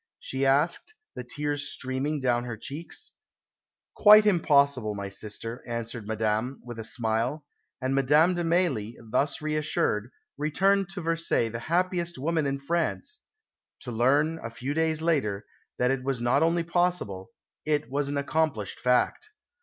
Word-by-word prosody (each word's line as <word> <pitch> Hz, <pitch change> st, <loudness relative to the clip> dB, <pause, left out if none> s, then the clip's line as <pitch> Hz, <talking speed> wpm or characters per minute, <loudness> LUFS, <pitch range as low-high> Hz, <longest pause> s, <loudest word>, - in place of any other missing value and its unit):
she 135 Hz, +1 st, -1 dB
asked, 150 Hz, -, +1 dB, 0.2 s
the 125 Hz, -, -6 dB
tears 145 Hz, +3 st, -2 dB
streaming 135 Hz, +3 st, -2 dB
down 120 Hz, -2 st, +1 dB
her 120 Hz, -2 st, -5 dB
cheeks. 165 Hz, -, -6 dB, 0.8 s
"Quite 210 Hz, 0 st, +8 dB
impossible, 140 Hz, -, +3 dB
my 100 Hz, -1 st, -5 dB
sister," 105 Hz, +4 st, -6 dB
answered 115 Hz, -2 st, -5 dB
Madame, 110 Hz, +4 st, -1 dB
with 120 Hz, -2 st, -7 dB
a -, -, -4 dB
smile; 120 Hz, +6 st, -1 dB, 0.3 s
and 130 Hz, 0 st, -1 dB
Madame 150 Hz, +6 st, +4 dB
de 175 Hz, -1 st, -2 dB
Mailly, 165 Hz, -, 0 dB
thus 135 Hz, +7 st, -1 dB
reassured, 150 Hz, -8 st, 0 dB, 0.3 s
returned 195 Hz, +6 st, +2 dB
to 190 Hz, -1 st, -6 dB
Versailles 165 Hz, -8 st, 0 dB
the 115 Hz, +1 st, -5 dB
happiest 175 Hz, -1 st, 0 dB
woman 155 Hz, +2 st, 0 dB
in 140 Hz, 0 st, -1 dB
France 170 Hz, -, -2 dB, 0.6 s
to 125 Hz, -, -6 dB
learn, 145 Hz, +8 st, +2 dB
a 115 Hz, -, -4 dB
few 125 Hz, +5 st, -4 dB
days 160 Hz, 0 st, 0 dB
later, 110 Hz, -12 st, 0 dB, 0.3 s
that 125 Hz, +1 st, +2 dB
it 135 Hz, -1 st, -1 dB
was 135 Hz, -2 st, -1 dB
not 120 Hz, +2 st, +2 dB
only 165 Hz, +1 st, +2 dB
possible, 170 Hz, -, -1 dB, 0.3 s
it 150 Hz, -1 st, 0 dB
was 140 Hz, +1 st, 0 dB
an 145 Hz, -, -2 dB
accomplished 140 Hz, -7 st, -1 dB
fact. 125 Hz, -, +1 dB
140 Hz, 145 wpm, -27 LUFS, 120-165 Hz, 0.8 s, Quite